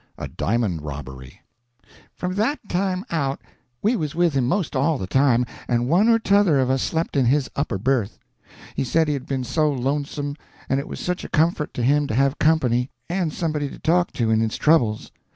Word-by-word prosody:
A - - -5
DIAMOND 100 -3 -1
ROBBERY 65 -3 -9 0.7
From 180 0 -3
that 225 +10 0
time 185 0 -1
out, 140 -5 -1 0.4
we 220 +5 +3
was 155 -8 -3
with 170 -2 +2
him 130 -3 +1
'most 180 +1 -1
all 140 +3 +2
the 95 - -4
time, 125 +3 +3 0.2
and 120 0 +1
one 185 - +4
or 230 - +6
t'other 200 -8 +3
of 130 0 +2
us 130 -1 +1
slept 165 0 -2
in 135 -3 +3
his 135 +2 +1
upper 140 -8 -1
berth. 120 0 0 0.6
He - - -1
said 160 +5 +2
he 150 - +1
had 140 -2 -5
been 135 -2 -2
so 150 +4 +1
lonesome, 145 +2 -2 0.3
and 135 - +1
it 140 - -5
was - - -7
such 180 0 -2
a - - -7
comfort 160 -1 +1
to 120 - -2
him 145 +3 +3
to 110 - -2
have 135 +2 +2
company, 130 -6 +2 0.2
and 175 -3 0
somebody 150 -3 -2
to - - -10
talk 175 +2 +1
to 115 -2 0
in 110 - +3
his 110 -1 -1
troubles. 120 -9 +2
140 Hz, 205 wpm, -23 LUFS, 125-165 Hz, 0.7 s, or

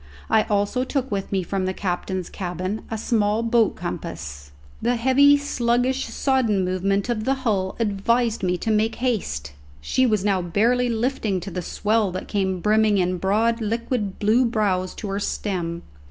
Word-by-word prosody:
I 220 -1 +4
also 205 +5 0
took 265 -1 -2
with 195 -1 -3
me 190 -2 0
from 190 +1 -2
the 185 - -2
captain's 185 -1 -3
cabin 185 +2 -4
a 225 - -3
small 215 -1 +1
boat 230 -2 +2
compass. 75 - -6 0.3
The 245 +1 +1
heavy, 270 +4 +5
sluggish, 255 -1 0
sodden 230 -8 +1
movement 195 +3 0
of 235 -3 -1
the 270 +4 +1
hull 190 -4 0
advised 230 +2 +1
me 180 -1 0
to 220 - -2
make 220 +1 +1
haste. 185 - -2 0.3
She 255 - +1
was 210 -4 +1
now 195 -3 +2
barely 235 +8 +2
lifting 230 -4 0
to 195 +3 -7
the 180 +1 -3
swell 210 +3 0
that 185 - -5
came 190 -3 -1
brimming 215 0 +3
in 180 -1 0
broad 225 +5 +1
liquid 225 -2 -2
blue 220 +5 +3
brows 200 -6 0
to 215 - -6
her 195 +1 -2
stem. 175 -5 -3
210 Hz, 170 wpm, -23 LUFS, 185-235 Hz, 0.3 s, heavy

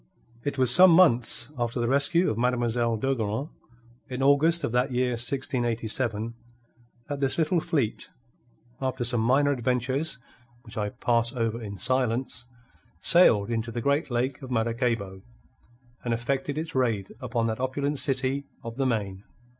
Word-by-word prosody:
It 145 0 -3
was 130 -2 +6
some 185 +4 +8
months 130 -7 +4
after 120 +1 -2
the 120 - 0
rescue 140 +7 +3
of - - -3
Mademoiselle 120 -1 0
d'Ogeron 120 +2 -2 0.6
in 130 +1 -3
August 155 +5 +4
of - - -1
that 125 +3 0
year 125 0 0
1687 120 -2 -2 0.7
that 145 -1 -4
this 135 -1 +1
little 165 +2 +1
fleet, 150 -10 -2 0.7
after 130 -1 -2
some 120 -1 +3
minor 135 +5 +3
adventures 130 +3 -1 0.5
which 115 0 -12
I 105 -2 -2
pass 120 0 0
over 115 -1 -2
in 100 -2 -7
silence, 125 +2 -1 0.6
sailed 115 - +4
into 115 0 -2
the 120 - -4
great 140 +5 0
lake 130 +3 -2
of 130 - -9
Maracaybo 115 -5 -2 0.8
and 120 -1 0
effected 135 +4 -3
its 160 +1 -4
raid 115 -7 -1
upon 120 -3 -2
that 110 0 -2
opulent 140 +2 -2
city 135 +1 -1 0.2
of 115 0 -8
the 135 -1 +1
Main. 100 -5 -3
125 Hz, 145 wpm, -26 LUFS, 115-135 Hz, 0.8 s, some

